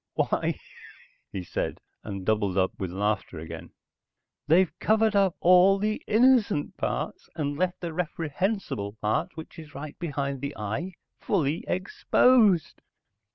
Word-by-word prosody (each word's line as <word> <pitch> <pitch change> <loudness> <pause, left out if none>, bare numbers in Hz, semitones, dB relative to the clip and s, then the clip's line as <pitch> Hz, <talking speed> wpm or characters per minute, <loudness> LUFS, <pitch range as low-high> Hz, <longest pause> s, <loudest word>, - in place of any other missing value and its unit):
"Why," - - 0 0.7
he 95 - -4
said, - - -3 0.2
and 100 -3 -6
doubled 105 -3 +1
up 95 -1 +2
with 95 - -2
laughter 100 -1 -2
again. 80 +1 -8 0.8
"They've 170 +3 +4
covered 220 0 +2
up 195 -3 +3
all 185 +2 +6
the 215 +2 -1
innocent 225 - +3
parts - - -3
and 145 -3 -2
left 180 +3 -1
the 170 -2 -4
reprehensible 165 - -2
part, 110 +8 -1
which 160 +1 -9
is 150 -3 -12
right 145 +1 -8
behind 140 -5 -3
the 140 0 -5
eye, 110 - -3 0.3
fully 165 -5 0
exposed." 200 +1 +3
160 Hz, 130 wpm, -27 LUFS, -, 0.8 s, all